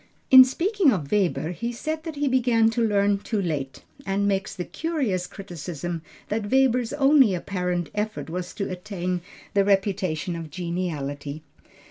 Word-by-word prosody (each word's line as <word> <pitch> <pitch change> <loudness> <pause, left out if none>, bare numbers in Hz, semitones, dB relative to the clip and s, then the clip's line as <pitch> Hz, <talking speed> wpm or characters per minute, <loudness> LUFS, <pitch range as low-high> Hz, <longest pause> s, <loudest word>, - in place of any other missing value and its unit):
In 260 -1 +12
speaking 345 - +2
of 155 - -2
Weber 175 -6 +1
he 235 +7 -3
said 310 +6 -4
that 320 -2 -5
he 290 0 0
began 240 -3 +3
to 235 - -1
learn 205 -2 +2
too 215 +1 -2
late, 150 -8 -3 0.2
and 200 -1 0
makes 195 0 -1
the 180 - -4
curious 260 - -2
criticism 175 -2 -6 0.3
that 210 -1 -2
Weber's 250 -3 +3
only 275 -7 +5
apparent 180 -1 -2
effort 210 +1 -3
was 180 +2 -5
to 200 - -2
attain 180 -1 -3 0.3
the 200 - +4
reputation 195 -4 0
of 165 -2 -6
geniality. 155 -4 -4
195 Hz, 150 wpm, -25 LUFS, 175-235 Hz, 0.3 s, In